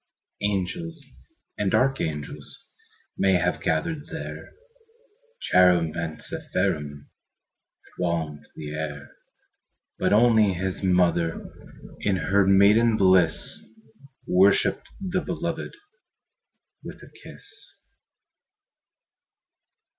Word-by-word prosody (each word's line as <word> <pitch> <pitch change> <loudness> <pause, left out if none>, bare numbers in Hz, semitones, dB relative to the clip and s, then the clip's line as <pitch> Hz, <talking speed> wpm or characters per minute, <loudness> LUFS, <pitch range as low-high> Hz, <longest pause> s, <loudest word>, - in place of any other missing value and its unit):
Angels 105 - -3 0.5
and 100 -2 +1
archangels 80 - -2 0.5
May 95 0 +3
have 90 - +1
gathered 145 - -1
there, - - -8 0.9
Cherubim 90 -3 +3
and 80 -2 -4
seraphim 75 -1 -3 0.8
Thronged 80 -4 -3
the 75 -1 -7
air; 75 -2 -6 0.9
But - - +1
only 110 -2 +5
His 95 +1 -3
mother, 90 -3 +1 0.5
In 100 - 0
her 95 +1 +2
maiden 105 +4 +5
bliss, 95 -4 +2 0.6
Worshipped 95 +2 +3
the 185 -1 -2
Beloved 170 - -4 1.1
With - - -10
a - - -15
kiss. - - -13
95 Hz, 80 wpm, -25 LUFS, 80-110 Hz, 1.1 s, only